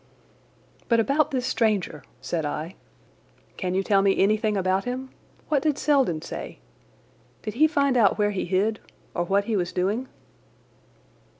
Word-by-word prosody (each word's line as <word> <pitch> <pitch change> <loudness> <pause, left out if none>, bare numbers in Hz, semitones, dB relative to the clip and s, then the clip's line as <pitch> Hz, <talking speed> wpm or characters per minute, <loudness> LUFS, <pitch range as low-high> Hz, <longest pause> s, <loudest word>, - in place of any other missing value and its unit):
"But 230 -1 +4
about 280 +6 +2
this 255 -4 -2
stranger," 205 - 0 0.2
said 165 -2 -2
I. 155 +4 -4 0.8
"Can 185 -1 -2
you 190 - +1
tell 195 -1 +3
me 195 0 +2
anything 210 +1 +2
about 190 +1 +1
him? 255 +1 -4 0.4
What 290 -3 +2
did 295 -1 +1
Selden 265 - +2
say? - - -7 0.9
Did 215 - -4
he 310 +6 +5
find 280 -4 +1
out 220 -5 +4
where 210 -1 +2
he 195 - -2
hid, 200 +4 0 0.3
or 175 - 0
what 200 +3 +2
he 225 - -1
was 180 -3 -1
doing?" 205 +8 -1
210 Hz, 155 wpm, -25 LUFS, 185-255 Hz, 0.9 s, he